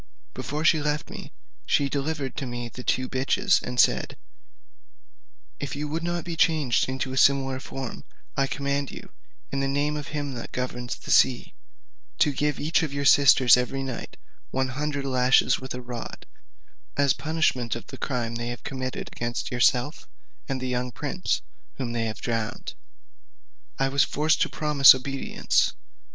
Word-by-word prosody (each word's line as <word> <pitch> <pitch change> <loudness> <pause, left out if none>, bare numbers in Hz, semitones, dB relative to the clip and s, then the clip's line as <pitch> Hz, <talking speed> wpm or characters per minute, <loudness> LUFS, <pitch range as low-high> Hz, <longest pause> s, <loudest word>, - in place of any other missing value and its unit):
Before 150 +2 -4
she 160 -2 +4
left 150 +1 -2
me, - - -8 0.4
she 140 - +2
delivered 140 -1 -3
to 135 - -3
me 120 -1 -5
the 125 +3 -9
two 130 +1 0
bitches, 155 +10 +2
and 125 - -4
said, - - +3 1.4
"If 140 -2 -4
you 150 +1 -3
would 160 +2 -2
not 175 0 -2
be 170 -1 -5
changed 150 -7 +2
into 130 0 -3
a - - -4
similar 135 -1 +3
form, 135 -2 -7 0.3
I 135 0 +1
command 140 0 -2
you, - - -10 0.4
in 140 - -1
the 135 - 0
name 145 +2 0
of 150 -1 -5
him 145 -2 -4
that 115 - -7
governs 125 -1 -4
the - - -7
sea, 130 -2 +3 0.6
to 145 - +3
give 150 +2 -1
each 160 +4 +2
of 160 -3 -2
your 140 0 -3
sisters 135 -3 +7
every 125 +2 -2
night 130 -3 -6 0.3
one 130 0 -1
hundred 145 +1 -3
lashes 130 -1 +3
with 130 0 -6
a 125 - -6
rod, 120 -1 -7 0.7
as 140 -1 +4
the - - -14
punishment 155 -7 0
of 115 - -7
the - - -10
crime 120 -3 -2
they 120 0 -4
have 120 0 -6
committed 130 -1 -4
against 120 0 -4
yourself, 125 +4 +1 0.4
and 135 -1 -1
the 130 - -3
young 125 0 -2
prince, - - -2 0.3
whom 125 -3 -4
they 115 -1 -1
have 110 -1 -4
drowned." 115 0 -3 1.0
I 135 - +2
was 140 0 +3
forced 155 +2 +1
to - - +2
promise 150 -3 +6
obedience. 135 +1 0
135 Hz, 170 wpm, -26 LUFS, 125-145 Hz, 1.4 s, sisters